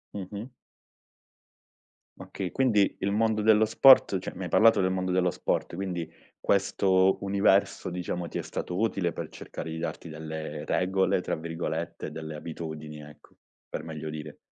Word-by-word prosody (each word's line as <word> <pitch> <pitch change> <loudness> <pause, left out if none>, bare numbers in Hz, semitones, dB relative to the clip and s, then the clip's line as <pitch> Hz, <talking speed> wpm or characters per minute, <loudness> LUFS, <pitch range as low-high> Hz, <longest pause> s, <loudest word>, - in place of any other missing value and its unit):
Mh-mh. 100 +5 -6 1.7
Okay, 95 -2 -5
quindi 115 -7 +3
il 100 - 0
mondo 110 0 +1
dello 110 0 +5
sport 115 -4 +6
cioè - - -6
mi 95 - -6
hai - - -5
parlato 115 +4 +5
del 95 -1 +2
mondo 95 0 -1
dello 90 -1 +2
sport, - - -2
quindi 90 -4 -3 0.3
questo 95 -1 +3
universo, 100 -1 +2
diciamo, 90 0 -4
ti - - -4
è - - -1
stato 90 +2 -4
utile 100 -6 0
per - - -5
cercare 80 - -8
di 80 - -5
darti 85 - -5
delle 80 -1 -6
"regole", 95 +4 +1
tra - - -2
virgolette, 80 0 -4
delle 80 -1 -6
abitudini, 75 -1 -7
ecco, 75 0 -16 0.3
per - - -5
meglio 80 -1 -6
dire. 75 -1 -7
90 Hz, 155 wpm, -28 LUFS, 80-100 Hz, 1.7 s, sport